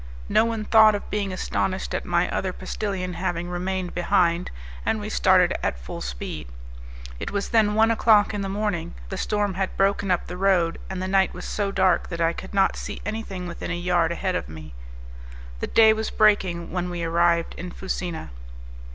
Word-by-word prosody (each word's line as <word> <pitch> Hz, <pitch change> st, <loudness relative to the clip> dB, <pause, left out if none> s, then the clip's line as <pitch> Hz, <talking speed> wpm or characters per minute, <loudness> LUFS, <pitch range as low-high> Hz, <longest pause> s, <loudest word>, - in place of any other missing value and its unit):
No 220 Hz, -, +4 dB
one 225 Hz, -2 st, -2 dB
thought 220 Hz, -1 st, +6 dB
of 205 Hz, -, -5 dB
being 200 Hz, -2 st, -1 dB
astonished 185 Hz, 0 st, -2 dB
at -, -, -2 dB
my 175 Hz, 0 st, +1 dB
other 190 Hz, -, -1 dB
postillion 185 Hz, -1 st, -4 dB
having 175 Hz, 0 st, -3 dB
remained 180 Hz, 0 st, -3 dB
behind, 175 Hz, -1 st, +1 dB, 0.3 s
and -, -, 0 dB
we -, -, -5 dB
started -, -, +4 dB
at -, -, -1 dB
full 60 Hz, -1 st, -8 dB
speed. -, -, -5 dB, 0.7 s
It -, -, -4 dB
was 200 Hz, 0 st, -2 dB
then 215 Hz, -3 st, +3 dB
one 225 Hz, +1 st, +4 dB
o'clock 220 Hz, -2 st, +4 dB
in 205 Hz, -, -2 dB
the 195 Hz, -, -3 dB
morning; 200 Hz, -, -2 dB
the -, -, -4 dB
storm 205 Hz, -2 st, 0 dB
had 190 Hz, +1 st, -3 dB
broken 195 Hz, 0 st, +1 dB
up 180 Hz, -1 st, +1 dB
the 180 Hz, -, -7 dB
road, 180 Hz, -3 st, +2 dB
and 190 Hz, -1 st, -4 dB
the -, -, -2 dB
night 190 Hz, 0 st, +2 dB
was -, -, -7 dB
so 200 Hz, -2 st, -2 dB
dark 190 Hz, -1 st, +2 dB
that 170 Hz, -, -5 dB
I 165 Hz, 0 st, +2 dB
could 190 Hz, +3 st, -8 dB
not 195 Hz, -, +3 dB
see -, -, -6 dB
anything 200 Hz, -5 st, -4 dB
within 170 Hz, -1 st, -6 dB
a 175 Hz, -, -2 dB
yard 175 Hz, -1 st, +1 dB
ahead 185 Hz, +2 st, -1 dB
of 180 Hz, -, -3 dB
me; 80 Hz, -3 st, -10 dB, 0.9 s
the -, -, -3 dB
day 220 Hz, -1 st, +6 dB
was 220 Hz, 0 st, -2 dB
breaking 190 Hz, -5 st, +2 dB
when 180 Hz, 0 st, -2 dB
we 175 Hz, -1 st, -4 dB
arrived 170 Hz, 0 st, +2 dB
in 180 Hz, +2 st, -6 dB
Fusina. 175 Hz, -, -5 dB
185 Hz, 195 wpm, -24 LUFS, 175-205 Hz, 0.9 s, thought